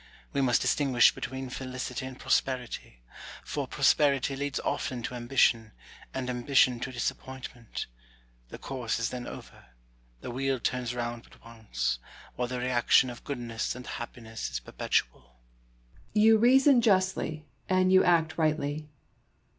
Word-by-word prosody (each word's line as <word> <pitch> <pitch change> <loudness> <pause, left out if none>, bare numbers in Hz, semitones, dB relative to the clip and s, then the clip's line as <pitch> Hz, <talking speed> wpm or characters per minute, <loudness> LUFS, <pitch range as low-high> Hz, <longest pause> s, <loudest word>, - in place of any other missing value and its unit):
We 140 - +1
must 125 -3 +3
distinguish 130 -5 +4
between 130 -1 -6
felicity 130 0 -5
and 130 -1 -9
prosperity; 125 - -2 0.4
for - - -3
pros - - +4
perity 140 -2 +1
leads 140 0 -2
often 125 -2 -2
to - - -4
ambition, 120 -2 +2 0.4
and 130 -1 -4
ambition 125 0 +3
to 130 - -4
disappoint 130 +1 -4
ment: 120 -2 -6 0.6
the - - -8
course 125 -4 -3
is 115 -1 -1
then 125 -1 -5
over; - - -10 0.6
the - - -6
wheel 135 +1 -1
turns 125 0 -2
round 120 -1 -4
but - - -20
once; 60 - -3 0.4
while 125 - -1
the 125 +1 -4
reaction 125 +1 +3
of 120 - -11
goodness 120 -6 -3
and 125 0 -9
happiness 115 - -6
is 60 0 -3
perpetual. - - -1
Brooke. - - -28 0.8
You 220 +1 +6
reason 260 +2 +6
justly 185 -7 +1 0.2
and 185 0 +3
you 190 0 +6
act 165 -1 +2
rightly. 150 -1 0
130 Hz, 145 wpm, -29 LUFS, 120-145 Hz, 0.8 s, You